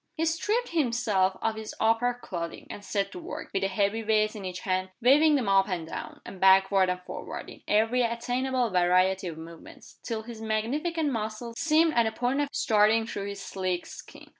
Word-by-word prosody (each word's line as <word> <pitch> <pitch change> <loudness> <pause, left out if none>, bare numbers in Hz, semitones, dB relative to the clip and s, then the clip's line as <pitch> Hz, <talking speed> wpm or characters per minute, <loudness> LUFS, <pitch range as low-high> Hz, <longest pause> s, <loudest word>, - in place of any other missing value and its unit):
He 325 - +1
stripped 415 +9 0
himself 230 - +1
of 225 - +1
his 220 -1 -7
upper 225 +2 +2
clothing, 170 -8 -6
and 205 - -8
set 200 -1 -2
to 180 - -8
work, - - -7
with 195 - 0
the 195 - +1
heavy 200 +3 0
weights 215 -1 +2
in 210 -3 -8
each 180 0 -5
hand, 185 -1 -1
waving 290 +5 +5
them 255 -7 0
up 195 -1 +4
and 170 -4 -3
down, - - -7
and 190 - -10
backward 190 0 +5
and 180 0 -1
forward, - - -7
in - - -14
every 225 +4 +2
attainable 245 +1 -1
variety 185 +1 +2
o - - -6
f - - -14
movement, 165 0 -12
till 225 -2 -4
his 225 -1 -9
magnificent 285 +9 -1
muscles 225 +1 -4
seemed 320 +1 +3
on 235 -1 +3
the 220 - 0
point 250 +5 0
of 290 - -1
starting 220 +1 +3
through 200 -3 -5
his 200 -1 -6
sleek 185 -2 -3
skin. - - -12
220 Hz, 200 wpm, -27 LUFS, 190-245 Hz, -, waving